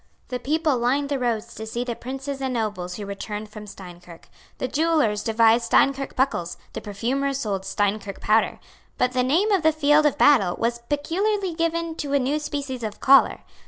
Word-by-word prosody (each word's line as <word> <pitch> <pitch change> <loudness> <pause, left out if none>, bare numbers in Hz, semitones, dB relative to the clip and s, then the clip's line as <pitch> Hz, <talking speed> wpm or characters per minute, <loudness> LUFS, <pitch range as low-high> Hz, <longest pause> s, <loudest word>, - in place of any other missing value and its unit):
The 250 - -3
people 300 0 0
lined 275 +4 +1
the 280 -2 -1
roads 235 -2 -2
to 220 0 -7
see 235 +2 -3
the 240 -2 -4
princes 270 +3 -6
and 260 -2 -2
nobles 200 -6 -3
who 205 - -6
returned 210 +2 -6
from 210 0 -10
Steinkirk. 175 -3 -12 0.3
The 255 - -2
jewellers 300 -9 +1
devised 225 +1 +3
Steinkirk 275 +3 +2
buckles; 175 -11 -1 0.2
the - - -5
perfumers 265 +7 -2
sold 195 -3 -3
Steinkirk 205 0 -1
powder. 220 +1 +1 0.4
But 250 - +1
the 255 0 +1
name 330 +12 +2
of 390 -3 +3
the 315 0 +4
field 300 0 +4
of 295 - -1
battle 215 -12 +4
was 235 +1 -1
peculiarly 375 +6 -1
given 335 0 -1
to 285 -2 -3
a - - +5
new 275 +4 0
species 280 -4 -4
of 215 -2 -5
collar. 275 0 +5
255 Hz, 185 wpm, -24 LUFS, 215-290 Hz, 0.4 s, a